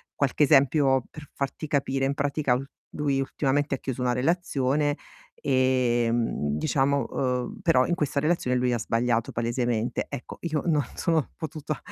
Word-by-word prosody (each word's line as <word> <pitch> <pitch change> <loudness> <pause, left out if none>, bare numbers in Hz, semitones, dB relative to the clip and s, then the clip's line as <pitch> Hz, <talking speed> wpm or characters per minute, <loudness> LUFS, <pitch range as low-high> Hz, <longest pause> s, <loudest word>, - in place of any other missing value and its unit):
qualche 140 +1 +1
esempio, 135 -2 +4
per 150 -2 -11
farti 140 +3 -4
capire. 135 -2 0
In 135 - +1
pratica 140 -2 0
lu 130 - -2 0.3
lui 140 -2 0
ultimamente 140 +1 0
ha - - -7
chiuso 130 -2 -5
una 125 -1 +1
relazione 145 0 +1 0.5
ehm, 120 - +1
diciamo, 140 - +1
uhm, 125 -2 -2
però 125 0 +4
in 175 - 0
questa 145 -4 0
relazione 155 -5 +1
lui 125 0 +1
ha 120 - 0
sbagliato 115 0 0
palesemente. 120 0 -1
Ecco, - - -7
io 155 -3 -1
non 155 -4 +3
sono 165 -4 0
potuta 155 -1 -5
135 Hz, 150 wpm, -26 LUFS, 125-145 Hz, 0.5 s, esempio